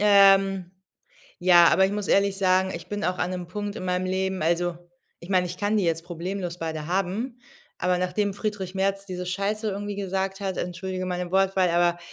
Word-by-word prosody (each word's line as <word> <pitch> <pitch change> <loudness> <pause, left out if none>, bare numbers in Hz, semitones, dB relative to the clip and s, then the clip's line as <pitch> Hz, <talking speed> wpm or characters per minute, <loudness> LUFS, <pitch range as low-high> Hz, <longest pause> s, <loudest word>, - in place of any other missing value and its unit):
Ähm, 195 -3 +5 0.7
ja, 175 -1 +7
aber 190 +3 +4
ich 195 - -3
muss 205 -1 -3
ehrlich 200 0 +3
sagen, 190 -1 +2
ich 170 - -8
bin 205 0 -3
auch 180 0 -1
an 180 - -1
'nem 180 -1 -4
Punkt 205 +3 -5
in 185 - -5
meinem 180 0 0
Leben 190 -1 -1
also, 170 +1 +1 0.4
ich 170 - -11
meine, 185 -2 +2
ich 180 +1 -6
kann 205 +2 0
die 200 - +2
jetzt 165 -1 0
problemlos 175 +1 -5
beide 160 -2 -4
haben, 195 - -2 0.4
aber 180 0 +1
nachdem 195 +2 -1
Friedrich 205 -3 -4
Merz 195 +1 0
diese 180 -1 -5
Scheiße 200 +4 -2
irgendwie 205 +1 -4
gesagt 195 0 -2
hat, 195 -2 -3
entschuldige 185 +1 -4
meine 180 -1 -3
Wortwahl, 190 -1 +3
aber 175 0 +2
190 Hz, 195 wpm, -25 LUFS, 180-195 Hz, 0.7 s, ja